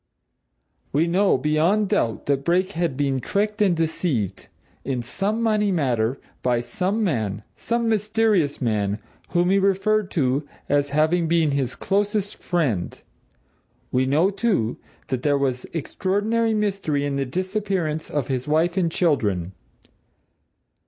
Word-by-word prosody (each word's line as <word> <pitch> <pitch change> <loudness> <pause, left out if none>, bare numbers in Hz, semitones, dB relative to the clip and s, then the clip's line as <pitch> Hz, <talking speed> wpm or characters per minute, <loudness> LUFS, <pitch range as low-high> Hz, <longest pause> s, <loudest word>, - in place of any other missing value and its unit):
We 150 +4 +2
know 190 +1 +3
beyond 160 +9 +2
doubt 115 -1 0
that 140 -1 0
Brake 185 +4 +1
had 165 -7 -1
been 140 -2 +1
tricked 210 - -1
and 190 -5 +3
deceived, 155 - -1 0.4
in 130 -3 -2
some 205 - -1
money 210 -2 +2
matter, 130 -7 0 0.2
by 125 -1 +1
some 185 - -1
man 110 - -1
some 235 0 -1
mysterious 210 -7 +1
man 105 -5 0 0.3
whom 175 +1 +2
he 195 - +4
referred 195 +1 +2
to 140 0 +1 0.2
as 145 0 +2
having 155 +3 +2
been 165 -2 +2
his 135 -3 -1
closest 205 0 -1
friend. 140 - -1 0.9
We 130 +1 +2
know, 160 +8 +3
too, 195 - 0 0.3
that 130 -2 -1
there 145 0 +2
was 130 -2 -1
extraordinary 205 +7 0
mystery 195 -9 0
in 140 -1 -1
the 135 - 0
disappearance 185 0 -2
of 145 -4 -2
his 130 -1 -2
wife 165 +4 +2
and 170 -3 +2
children. 105 - +1
160 Hz, 135 wpm, -23 LUFS, 135-195 Hz, 0.9 s, he